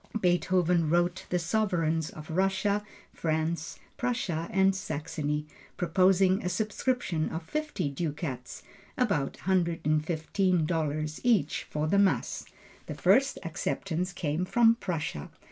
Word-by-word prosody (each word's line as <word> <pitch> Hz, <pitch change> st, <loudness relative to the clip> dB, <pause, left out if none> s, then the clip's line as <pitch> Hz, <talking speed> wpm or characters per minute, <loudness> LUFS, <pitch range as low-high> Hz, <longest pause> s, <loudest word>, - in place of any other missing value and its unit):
Beethoven 175 Hz, -2 st, +2 dB
wrote 175 Hz, +3 st, +1 dB
the 180 Hz, -, +1 dB
sovereigns 165 Hz, -4 st, 0 dB
of 155 Hz, +1 st, -10 dB
Russia, 195 Hz, +3 st, +1 dB, 0.3 s
France, 160 Hz, 0 st, -2 dB, 0.2 s
Prussia 195 Hz, -10 st, -1 dB
and 190 Hz, 0 st, +3 dB
Saxony, 150 Hz, -5 st, -3 dB, 0.3 s
proposing 185 Hz, +2 st, +3 dB
a 180 Hz, -, 0 dB
subscription 210 Hz, -3 st, -1 dB
of 160 Hz, +1 st, -4 dB
fifty 305 Hz, -, -2 dB
ducats, 140 Hz, -3 st, -4 dB, 0.3 s
about 200 Hz, -, +1 dB
$115 160 Hz, -2 st, 0 dB
each, 210 Hz, -, +2 dB
for 150 Hz, 0 st, -1 dB
the 200 Hz, +6 st, +3 dB
Mass. 200 Hz, -1 st, +1 dB, 0.4 s
The -, -, -5 dB
first 270 Hz, +1 st, +3 dB
acceptance 170 Hz, +2 st, -2 dB
came 160 Hz, -1 st, -2 dB
from 230 Hz, +4 st, +5 dB
Prussia. 165 Hz, -, -4 dB
175 Hz, 110 wpm, -29 LUFS, 155-195 Hz, 0.4 s, from